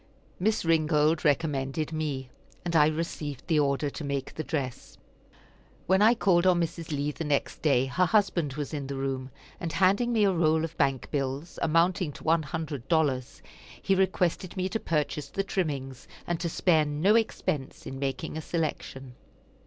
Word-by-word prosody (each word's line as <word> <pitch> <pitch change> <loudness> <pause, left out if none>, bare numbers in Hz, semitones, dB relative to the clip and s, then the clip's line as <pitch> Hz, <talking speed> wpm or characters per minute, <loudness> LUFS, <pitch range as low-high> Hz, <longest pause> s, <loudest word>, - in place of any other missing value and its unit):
Miss 215 +1 +1
Ringold 155 -1 +3
recommended 150 0 0
me, 140 -5 -3 0.3
and 170 -1 -2
I 150 -2 +6
received 155 -3 -3
the 160 -3 +2
order 140 0 +1
to 155 - -7
make 140 -2 -3
the 155 - -4
dress. 135 -7 -4 0.9
When 190 +2 +3
I 225 +3 +6
called 185 -4 +3
on 180 -2 +4
Mrs. 165 -1 -3
Lee 145 -1 -1
the 165 - -5
next 145 -2 -1
day, 135 -5 +3
her 180 +8 +1
husband 175 -8 +2
was 150 0 -4
in 140 -3 -3
the 140 - -4
room, 135 -1 -3 0.3
and 165 -2 -4
handing 200 +6 +3
me 220 -3 +3
a 200 - +4
roll 160 -2 +2
of 165 0 -4
bank 135 -3 0
bills, 140 +3 -3
amounting 170 +1 +2
to - - -12
one 165 +1 +3
hundred 150 -4 -5
dollars, 145 -7 0 0.4
he 195 - +1
requested 185 -1 0
me 185 0 0
to 225 - -2
purchase 150 -4 -2
the 195 - -2
trimmings, 140 -9 -3 0.2
and 175 -1 -2
to 170 - -2
spare 160 -1 +3
no 150 +8 +2
expense 160 -11 -1
in 135 - -6
making 135 +3 -3
a - - -3
selection. 145 -5 -4
155 Hz, 175 wpm, -28 LUFS, 140-175 Hz, 0.9 s, I